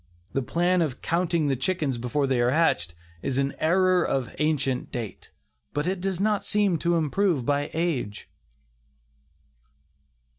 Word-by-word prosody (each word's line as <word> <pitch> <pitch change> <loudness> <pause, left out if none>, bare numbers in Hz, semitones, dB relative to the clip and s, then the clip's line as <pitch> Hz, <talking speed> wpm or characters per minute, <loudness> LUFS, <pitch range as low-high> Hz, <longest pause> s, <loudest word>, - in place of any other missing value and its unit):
The 135 - +1
plan 175 +7 +1
of 145 -6 -2
"counting 170 -2 +1
the 140 -2 +1
chickens 140 -2 -1
before 135 +4 0
they 130 -2 +1
are 120 - +3
hatched" 125 - +1 0.3
is 135 - -2
an 140 0 +1
error 185 +2 +3
of 130 -3 -1
ancient 140 -4 0
date, 115 -5 -6 0.5
but 145 +1 0
it 185 0 -1
does 190 -2 -1
not 210 0 +1
seem 205 -5 +2
to 170 +1 +1
improve 165 -2 +1
by 145 +1 0
age. 155 -11 -2
155 Hz, 145 wpm, -26 LUFS, 135-180 Hz, 0.5 s, are